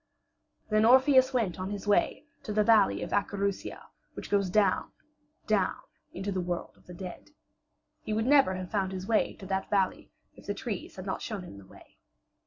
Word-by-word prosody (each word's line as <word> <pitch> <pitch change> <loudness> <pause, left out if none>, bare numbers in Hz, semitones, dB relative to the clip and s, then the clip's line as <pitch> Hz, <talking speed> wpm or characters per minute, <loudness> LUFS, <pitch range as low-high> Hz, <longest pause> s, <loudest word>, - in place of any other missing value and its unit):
Then 215 0 +4
Orpheus 260 +2 +6
went 220 -10 -1
on 185 +1 -3
his 205 0 -5
way 205 +8 +2 0.2
to 215 - -6
the 210 0 +3
valley 215 -3 +4
of - - -6
Acherusia 200 -1 -2 0.3
which - - -8
goes 200 -2 +2
down, 205 +2 +2 0.5
down 210 -3 +1 0.3
into 195 +2 -4
the 185 -1 -1
world 175 -1 -4
of - - -26
the 180 - -9
dead. 180 - -9 0.7
He - - -6
would 220 +1 0
never 270 -8 +5
have 185 -1 -6
found 195 -2 -1
his 185 0 -5
way 220 +1 +1
to 195 - -11
that 190 0 -2
valley 195 -2 0 0.2
if - - -16
the - - -2
trees - - -5
had - - -8
not - - -3
shown 210 -5 -5
him 100 - -11
the 95 - -15
way. - - -18
200 Hz, 195 wpm, -29 LUFS, 185-220 Hz, 0.7 s, Orpheus